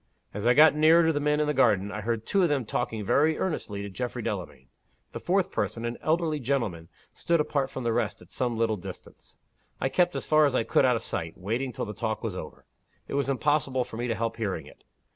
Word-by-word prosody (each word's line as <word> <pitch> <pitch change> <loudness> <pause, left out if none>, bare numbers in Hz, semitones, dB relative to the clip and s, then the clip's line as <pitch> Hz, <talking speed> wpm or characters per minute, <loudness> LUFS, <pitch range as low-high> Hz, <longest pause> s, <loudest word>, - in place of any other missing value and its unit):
As 105 +3 -2
I 125 - +5
got 155 +1 +8
nearer 160 +2 +5
to 160 - +3
the 145 - 0
men 150 +1 +1
in 150 - +2
the 150 - 0
garden, 105 -7 +3
I 105 - -4
heard 115 +1 -2
two 200 - +2
of 175 - +3
them 140 -5 0
talking 105 0 -3
very 155 +8 +3
earnestly 105 - -3
to 100 - -5
Geoffrey 120 +3 -4
Delamayn. 90 - -5 0.5
The - - -6
fourth 190 +1 +1
person, 115 0 -2
an 120 0 -4
elderly 160 -1 0
gentleman, 115 - -2 0.2
stood 170 -1 0
apart 140 -3 0
from 130 - -6
the 115 -1 0
rest 115 -3 -1
at - - -17
some 120 -3 -2
little 110 -1 +1
distance. 90 - -11 0.4
I 135 - 0
kept 175 +4 +2
as - - -3
far 155 -1 +5
as 135 - -2
I 115 - +2
could - - +3
out 125 -1 +4
of 115 - -3
sight, 80 0 -4
waiting 115 +8 -2
till - - -4
the 105 - -6
talk 110 +1 -3
was 110 -5 -3
over. 80 - -8 0.4
It - - -7
was 140 0 0
impossible 135 -1 +1
for 110 - -9
me 120 +1 -2
to 115 - -1
help 115 +1 -2
hearing 105 -5 -3
it. - - -17
125 Hz, 240 wpm, -27 LUFS, 110-150 Hz, 0.5 s, got